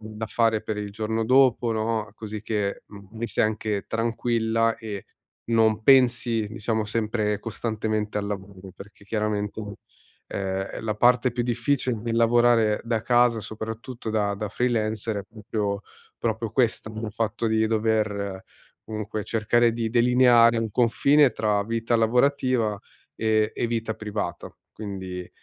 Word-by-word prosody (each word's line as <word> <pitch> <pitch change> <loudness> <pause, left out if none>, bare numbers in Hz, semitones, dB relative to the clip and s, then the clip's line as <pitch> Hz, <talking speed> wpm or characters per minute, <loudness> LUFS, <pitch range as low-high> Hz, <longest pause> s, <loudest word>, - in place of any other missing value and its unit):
da 110 0 -6
fare 115 -2 +1
per 110 - -3
il 105 -1 -4
giorno 110 +1 -2
dopo 125 -1 +4
no, 110 -1 -1
così 110 -1 -7
che, 105 -3 -2
mhmm, 100 -2 -13
mi 115 - -2
sei 105 - +1
anche 110 -1 -2
tranquilla 115 0 0
e 105 -3 -7 0.4
non 110 -1 +3
pensi 120 -3 +4
diciamo 110 0 -2
sempre 105 -1 -1
costantemente 110 -2 -3
al 100 - -3
lavoro. 95 -1 -7
Perché 100 0 -14
chiaramente, 105 -1 -3 0.5
ehm, 95 0 -3
la 110 -1 -1
parte 125 +2 +3
più 120 0 -1
difficile, 125 +1 0
nel 115 +1 -3
lavorare 115 -2 +4
da 115 -2 -1
casa 120 -2 +3
soprattutto 110 +3 -7
da 105 -2 0
da 105 +1 -4
freelancer, 110 -2 -1
è - - -4
proprio- 105 -2 -3 0.4
proprio 110 -1 -2
questo, 115 -3 +1
il 110 -1 -5
fatto 115 +1 -1
di 110 0 +2
dover 105 -3 -1 0.4
comunque 110 -1 -4
cercare 115 +1 +2
di 115 -1 -2
delineare 120 -1 +5
un 115 -1 -2
confine 130 +5 +4
tra 105 -2 +1
vita 115 +2 0
lavorativa 125 -2 +2 0.4
e 110 -1 +1
e - - -1
vita 115 -1 -2
privata. 105 -4 -4 0.2
Quindi, 95 -4 -6
110 Hz, 140 wpm, -25 LUFS, 105-115 Hz, 0.5 s, delineare